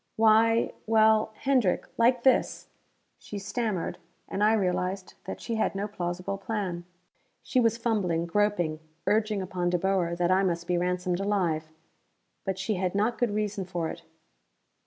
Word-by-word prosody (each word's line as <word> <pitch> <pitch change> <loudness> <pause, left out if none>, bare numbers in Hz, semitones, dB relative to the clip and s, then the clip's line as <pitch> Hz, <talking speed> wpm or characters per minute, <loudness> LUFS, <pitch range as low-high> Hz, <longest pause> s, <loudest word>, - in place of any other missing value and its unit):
"Why 225 +1 +4
well, 220 0 +4
Hendrick, 255 -9 +2
like 240 +1 +3
this 265 - +2 0.2
" - - -46
She 210 - -7
stammered, 205 -2 -2 0.3
and 200 - -1
I 215 +1 +5
realized 185 -2 -1
that 190 - -6
she 230 - -4
had 220 - 0
no 200 +1 -2
plausible 180 0 -4
plan. 190 -5 -3 0.6
She 255 - +1
was 230 -1 +3
fumbling, 200 -8 0
groping, 175 -4 0 0.3
urging 215 -2 +1
upon 180 -1 -2
De 180 - +2
Boer 180 -2 0
that 175 +1 +1
I 190 +1 +4
must 170 -3 -1
be 180 - 0
ransomed 180 0 0
alive. 175 -6 0 0.8
But 190 -1 -2
she 195 +1 -1
had 185 0 -1
not 215 +4 +1
good 245 - +2
reason 210 -2 -1
for 175 -3 -3
it. - - -7
195 Hz, 155 wpm, -28 LUFS, 180-220 Hz, 0.8 s, I